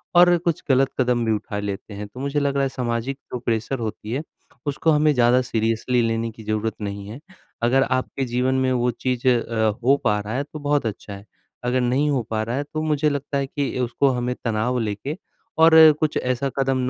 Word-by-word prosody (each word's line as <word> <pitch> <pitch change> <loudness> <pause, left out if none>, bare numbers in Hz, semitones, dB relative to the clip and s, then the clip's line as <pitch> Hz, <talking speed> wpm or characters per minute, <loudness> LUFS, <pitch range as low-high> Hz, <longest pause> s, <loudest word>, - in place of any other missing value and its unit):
और 175 0 +7
कुछ 170 -2 -2
गलत 135 0 +3
कदम 125 -2 +2
भी 110 - +1
उठा 105 -1 -2
लेते 100 +1 -5
हैं, 105 +1 -6
तो 115 +5 -12
मुझे 140 +2 -1
लग 140 -1 0
रहा 140 - +2
है 135 - +1
सामाजिक 125 0 -3 0.2
जो 125 - -2
प्रेशर 120 +2 -2
होती 110 -1 -5
है, 140 +5 -2 0.4
उसको 150 +3 +1
हमें 150 0 +3
ज़्यादा 125 0 +4
सीरियसली 115 +1 0
लेने 115 0 -1
की 110 0 -13
ज़रूरत 110 0 -2
नहीं 100 -1 -5
है। 115 +5 -8 0.4
अगर 130 +3 +4
आपके 130 +1 -1
जीवन 125 +2 0
में 130 - +1
वो 125 -1 +1
चीज़ 125 +1 -2
अ, 115 -2 +1
हो 135 +3 +4
पा 105 -3 +2
रहा 105 +2 -5
है 140 - 0
तो 155 +1 -10
बहुत 145 -3 0
अच्छा 105 -1 -5
है, 100 +1 -10 0.4
अगर 125 +1 +1
नहीं 130 +5 +1
हो 135 -3 +1
पा 110 -1 -1
रहा 115 +3 -3
है 145 - -1
तो 155 +2 -5
मुझे 150 -1 +1
लगता 145 0 -3
है 135 -1 -1
कि 140 -2 -3
उसको 125 +3 +1
हमें 125 -1 -1
तनाव 115 +2 0
लेके 110 +7 -3 0.5
और 165 0 +7 0.3
कुछ 155 -1 0
ऐसा 130 +2 -1
कदम 135 -1 +1
125 Hz, 215 wpm, -22 LUFS, 115-140 Hz, 0.5 s, और